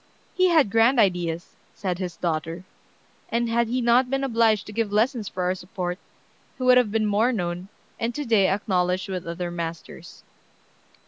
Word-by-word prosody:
"He 370 0 +3
had 310 - +4
grand 230 +4 +4
ideas," 175 -4 0 0.2
said 185 -3 -3
his 180 -2 -5
daughter, 165 +1 -3 0.7
"and 235 +1 0
had 235 0 +1
he 250 +3 -1
not 245 +2 +3
been 270 +1 -1
obliged 225 -5 +2
to 210 - -9
give 225 -1 -1
lessons 220 +1 +1
for 185 - -4
our 180 +1 +1
support, 180 -1 -5 0.6
he 255 - -5
would 250 0 +6
have 230 -5 0
been 220 0 +1
more 210 +4 +2
known, 180 -4 -3 0.3
and 230 +1 -2
to 295 - -3
day 215 -5 +4
acknowledged 185 -1 0
with 185 -3 -4
other 175 +1 -4
masters." 170 -1 -7
205 Hz, 175 wpm, -24 LUFS, 180-235 Hz, 0.7 s, would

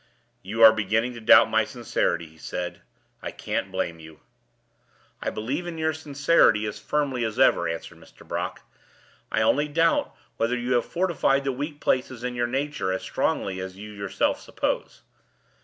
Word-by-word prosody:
"You 110 +4 0
are 110 0 +10
beginning 110 +3 0
to 115 - -9
doubt 110 - +7
my - - +4
sincerity," 85 -1 -1
he 80 0 -18
said. 90 +2 -5 0.4
"I - - -4
can't 95 - -3
blame 85 -3 -2
you." 80 -1 -13 1.0
"I - - -1
believe 135 +11 -3
in 170 -2 -5
your 160 0 0
sincerity 145 -7 +3
as 105 0 -5
firmly 135 0 -1
as 110 -2 -3
ever," 85 - +4
answered 85 - -6
Mr. - - -18
Brock. - - -3 0.7
"I 110 - +2
only 145 +6 +3
doubt 165 +3 +1 0.2
whether 115 +2 +1
you 120 +1 -3
have 120 -1 +2
fortified 170 -6 +1
the 135 - 0
weak 145 +3 -5
places 130 -3 0
in 125 0 -2
your 120 0 0
nature 135 -6 -2
as 95 - -2
strongly 95 -1 -1
as 95 0 -6
you 105 +1 -9
yourself 100 -2 -1
suppose. - - -3
120 Hz, 170 wpm, -25 LUFS, 100-145 Hz, 1.0 s, are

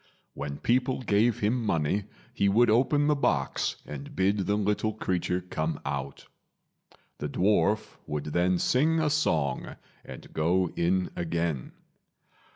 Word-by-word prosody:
When 70 0 -5
people 125 +1 +1
gave 110 +1 +2
him 115 +4 +1
money 95 0 0 0.3
he 100 - +2
would 115 +3 +4
open 140 +5 +3
the 150 - +4
box 75 - 0
and 70 -1 -8
bid 95 +1 +1
the 105 - +2
little 105 +1 0
creature 90 -3 -1
come 80 -3 -3
out. 70 0 -4 0.9
The 75 - -3
dwarf 105 +5 +1
would 75 -1 -3
then 90 +1 +2
sing 155 - +2
a 155 -2 +1
song 75 - 0 0.3
and - - -11
go 85 +3 +1
in 90 +2 +1
again. 85 -5 -2
95 Hz, 135 wpm, -28 LUFS, 80-110 Hz, 0.9 s, would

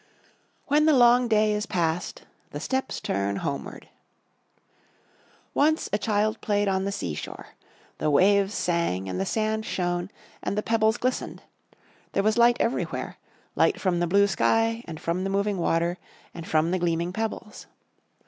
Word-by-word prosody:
"When 300 +2 +3
the 305 -3 +5
long 245 0 +5
day 215 -1 +3
is 210 0 -2
past, 170 0 -2 0.3
the - - -6
steps 265 0 -2
turn 100 +1 -1
homeward." 140 - -5 1.7
Once 310 +2 +2
a 205 - +2
child 215 +1 0
played 205 -1 0
on 190 0 0
the 200 - -1
sea 85 - -3
shore. - - -8 0.5
The 155 - +1
waves 200 +6 +3
sang 170 - -1
and 95 0 -3
the 95 - -2
sand 220 0 -1
shone 175 -2 -2 0.3
and 200 - -3
the 210 - 0
pebbles 220 0 +2
glistened. 255 +1 -3 0.7
There 195 - +1
was 215 +1 +2
light 240 0 +5
everywhere; 235 - -2 0.4
light - - +2
from 180 -3 0
the 175 - +1
blue 200 +4 +4
sky, 225 +3 +1
and 160 -2 -7
from 170 +2 -2
the 195 - -2
moving 200 0 0
water, 170 +1 0 0.3
and 170 - -8
from 160 +2 +1
the 185 - 0
gleaming 170 0 -1
pebbles. 220 0 -5
200 Hz, 160 wpm, -26 LUFS, 170-220 Hz, 1.7 s, the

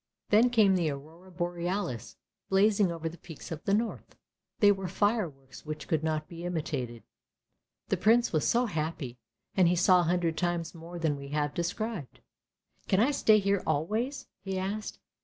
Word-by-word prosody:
Then 225 +4 +6
came 215 -5 +4
the 170 -4 +1
Aurora 155 +6 -9
Borealis 175 - -3 0.3
blazing 200 -1 +4
over 165 -1 -4
the 170 +1 -7
peaks 165 -2 -10
of 160 -2 -5
the 200 - +2
north; 225 +1 -3 0.4
they 205 -2 +6
were 195 -2 -2
fireworks 175 - -1
which 155 0 -6
could 160 -3 0
not 155 -1 -1
be 170 -1 -9
imitated. 145 -9 -3 0.9
The - - +1
Prince 230 +1 +3
was 155 - +2
so 240 +1 +3
happy, 155 - -3 0.4
and 185 -3 +5
he 175 - +3
saw 180 +1 +5
a - - +3
hundred 170 -2 +1
times 175 -2 -1
more 170 +1 -9
than 160 -4 0
we 140 0 -8
have 145 0 -1
described. 175 - -3 0.3
" - - -40
Can 190 - +3
I 245 +7 +4
stay 220 -6 +5
here 200 -1 +1
always? 230 - -1
" - - -57
he 195 -1 -3
asked. 200 +3 -3
175 Hz, 175 wpm, -29 LUFS, 155-205 Hz, 0.9 s, Then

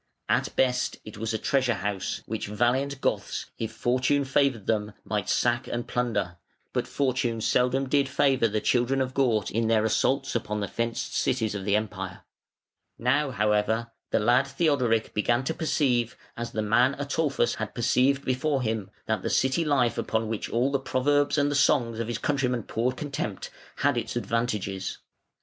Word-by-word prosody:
At - - 0
best 125 -1 +1
it 105 - -9
was 115 +1 -2
a 110 - 0
treasure 130 0 +1
house, 100 0 -3
which - - -4
valiant 130 +6 0
Goths, - - -1
if 110 -1 -3
Fortune 130 +5 +1
favoured 135 -6 +1
them, 105 -1 0
might 105 -3 -2
sack 120 +1 +1
and 120 0 -3
plunder: 115 -8 -1 0.4
but - - -1
Fortune 130 -4 0
seldom 125 +4 +1
did 140 0 +2
favour 135 -3 +3
the 105 0 -1
children 125 +4 +2
of 130 -1 -1
Gaut 120 -7 +1
in 115 +1 0
their 110 -1 +3
assaults 135 +4 +1
upon 105 -2 -2
the 100 - -2
fenced 115 +4 -3
cities 110 -4 0
of 100 -2 -5
the 100 0 +2
Empire. 110 -1 -3 0.8
Now, 135 +5 +2
however, 110 0 +1 0.2
the - - +2
lad 120 +5 +3
Theodoric 135 -6 +1
began 120 +4 +1
to 160 - -1
perceive, 125 -7 0 0.2
as 120 0 -5
the 110 - -2
man 125 +5 +3
Ataulfus 145 -2 0
had 110 -1 -5
perceived 130 +3 +2
before 130 +1 0
him, 110 -4 -2 0.2
that 110 -3 -1
the - - -2
city 130 +5 +2
life 135 -6 +2
upon 110 0 -1
which 110 -1 -3
all 125 +4 +1
the 140 - +1
proverbs 145 +3 +1
and 145 0 +2
the - - 0
songs 130 -5 +2
of 115 - -2
his 120 -1 -2
countrymen 125 -4 0
poured 125 +5 -1
contempt, 140 -9 -4 0.2
had - - +1
its - - -3
advantages. 105 -5 -2
120 Hz, 170 wpm, -27 LUFS, 110-135 Hz, 0.8 s, favour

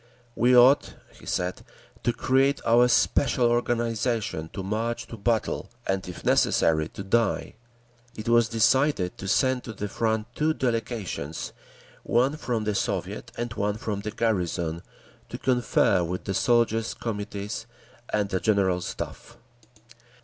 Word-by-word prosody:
"We 125 +1 +4
ought," 130 +4 +5 0.2
he - - -15
said, 90 0 -2 0.4
"to 120 - +1
create 135 +3 +2
our 120 +2 +5
special 125 0 +2
organisation 115 -7 -1
to 95 - -5
march 115 +4 -2
to - - -7
battle, 115 +1 -1 0.2
and 95 -1 -2
if 90 - -9
necessary 80 -1 +3
to 100 - -8
die…." 110 +2 0 0.6
It 110 - -6
was 120 -1 +4
decided 115 -3 +2
to 95 - -5
send 125 +6 +2
to 110 - -6
the 105 0 -4
front 110 +1 -1
two 155 +4 +1
delegations, 115 - -3 0.5
one 130 +5 +2
from 120 -6 -2
the 105 0 -1
Soviet - - -3
and 120 -1 -3
one 105 0 -1
from 105 -2 -3
the 105 - -4
garrison, 90 -7 -1 0.5
to - - -5
confer 125 -7 +2
with 90 +2 -4
the 95 - -3
Soldiers' 115 +1 +2
Committees 105 -2 -5 0.4
and 105 -1 0
the 95 -1 0
General 95 -4 +2
Staff. 90 - -7
110 Hz, 140 wpm, -26 LUFS, 100-120 Hz, 0.6 s, ought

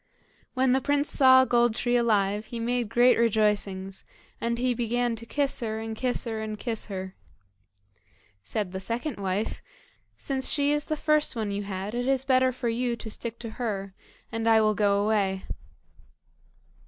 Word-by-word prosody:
When 260 0 +3
the 265 +1 +2
prince 290 +1 +1
saw 260 -2 +6
Gold 240 -2 +2
tree 245 +1 0
alive 210 -3 +1
he 235 - -6
made 240 -1 -1
great 240 +2 +4
rejoicings, 205 -4 0 0.4
and 235 0 -1
he 250 +1 +1
began 240 0 -1
to 230 +1 -9
kiss 280 +1 -1
her, 220 -3 -3
and 225 0 -5
kiss 250 +2 -1
her, 220 -2 -3
and 215 -1 -4
kiss 225 -1 -3
her. 190 -2 -6 1.3
Said 190 - -3
the 190 - -4
second 230 +6 -4
wife, 195 +2 -2 0.6
"Since 265 -2 0
she 285 -1 +2
is 295 0 -1
the 310 - -2
first 305 -2 +1
one 215 -3 -2
you 200 0 -2
had 195 +1 -5
it 245 +1 -2
is 270 -1 +1
better 260 -1 +3
for 250 -1 -4
you 240 +1 0
to 225 -1 -8
stick 235 +1 -4
to 230 - -6
her, 195 -4 -3 0.4
and 225 0 0
I 225 -1 +6
will 215 -1 +3
go 200 -1 +2
away." 195 -3 0
230 Hz, 175 wpm, -27 LUFS, 210-250 Hz, 1.3 s, saw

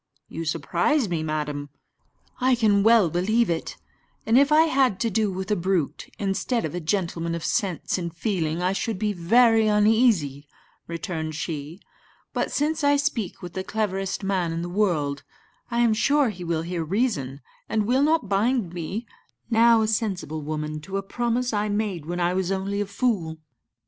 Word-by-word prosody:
"You 165 +1 -6
surprise 175 - +1
me, 170 -3 -2
madam." 150 -2 -3 0.7
"I 255 0 +3
can 210 -4 +3
well 220 -5 +5
believe 215 +5 +2
it; 165 - -3 0.5
and 225 - +2
if 280 +3 +5
I 310 +1 +7
had 265 - +2
to 230 - +1
do 210 0 +1
with 190 +1 -4
a - - +4
brute, 180 -4 -1
instead 205 +4 -1
of 155 - -4
a 175 - -2
gentleman 170 -1 -1
of 170 - -5
sense 185 -2 -1
and 170 -1 -4
feeling, 170 -2 -2
I 185 +1 +2
should 200 +2 -2
be 210 +1 -1
very 225 +5 +4
uneasy," 210 - +2 0.4
returned 165 -2 -4
she; 155 +2 -5 0.5
"but - - -1
since 310 +2 0
I 285 0 +4
speak 280 - -2
with 175 - -7
the 190 - -3
cleverest 195 -2 -2
man 190 -4 0
in 165 +1 -3
the 175 - -4
world, 165 -8 0 0.5
I 235 0 0
am 235 -2 +4
sure 280 +4 +3
he 185 -4 -7
will 165 -2 -1
hear 170 -1 -3
reason, 155 - -1 0.3
and 215 -1 +1
will 255 +5 +2
not 310 -5 +2
bind 205 -1 +1
me, 185 +7 -4 0.5
now 230 0 +5
a - - +1
sensible 195 - -2
woman, 155 0 -4
to 195 +5 -4
a 195 - -3
promise 240 +3 -1
I 210 0 0
made 205 -7 -2
when 175 +1 -3
I 175 0 +1
was 185 0 -1
only 195 +1 -1
a 205 - -2
fool." 200 -7 -1
195 Hz, 180 wpm, -24 LUFS, 170-225 Hz, 0.7 s, I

